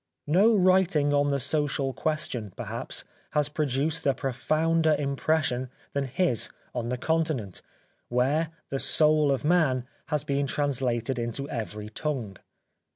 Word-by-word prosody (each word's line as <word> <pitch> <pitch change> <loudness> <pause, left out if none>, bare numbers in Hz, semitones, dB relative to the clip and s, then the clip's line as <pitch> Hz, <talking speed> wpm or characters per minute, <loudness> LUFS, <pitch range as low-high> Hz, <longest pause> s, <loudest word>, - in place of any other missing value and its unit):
No 195 +9 +4
writing 185 -6 +3
on 145 0 +3
the 140 -1 +1
social 140 -1 0
question, 120 - -2
perhaps, - - -4 0.3
has 150 -1 +2
produced 150 +1 -1
a 135 - +3
profounder 155 +4 +1
impression 140 -2 0 0.2
than 140 -1 0
his 135 -1 +1 0.2
on 120 -1 -3
the 125 - -1
continent, 155 - -1 0.5
where 140 +6 +1
" - - -42
The 135 - -1
Soul 155 -1 +4
of 135 +2 -1
Man 150 -7 +3
" - - -38
has 150 -2 -1
been 140 -1 0
translated 130 -3 0
into 120 +4 -2
every 105 -4 -5
tongue. 115 - -4
140 Hz, 140 wpm, -27 LUFS, 125-155 Hz, 0.5 s, No